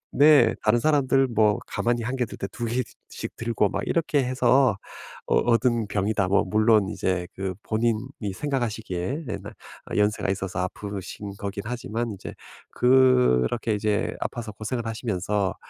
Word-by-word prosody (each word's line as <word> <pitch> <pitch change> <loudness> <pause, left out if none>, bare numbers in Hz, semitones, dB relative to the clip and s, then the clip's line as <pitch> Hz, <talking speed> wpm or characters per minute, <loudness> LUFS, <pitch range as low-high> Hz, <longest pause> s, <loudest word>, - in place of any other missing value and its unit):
네 150 +1 +6
다른 110 +2 +3
사람들 135 -2 +3
뭐 105 -3 +3
가만히 120 0 -1
1 125 +3 -2
개 125 - 0
들 - - -9
때 100 - -4
2 120 - -4
개씩 120 +1 -5
들고 115 -3 0
"막 100 - -2
이렇게 155 -4 +1
해서 125 -2 +3 0.5
어 - - +2
얻은 120 -2 +2
병이다", 100 -1 0
뭐 100 +2 +3
물론 110 0 +3
이제 90 -4 -1
그 95 -1 -3
본인이 115 -1 -1
생각하시기에. 120 - -3
예. 100 - -2
나 105 +3 -9 0.4
어 - - -2
연세가 105 -1 +1
있어서 95 -2 -3
아프신 100 +1 -6
거긴 100 0 -4
하지만 115 -1 -3
이제 95 - -8 0.4
그렇게 125 - +3
이제 105 +1 -1
아파서 115 -3 -4
고생을 110 +3 -4
하시면서 105 -3 -1
110 Hz, 300 characters per minute, -25 LUFS, 100-125 Hz, 0.5 s, 네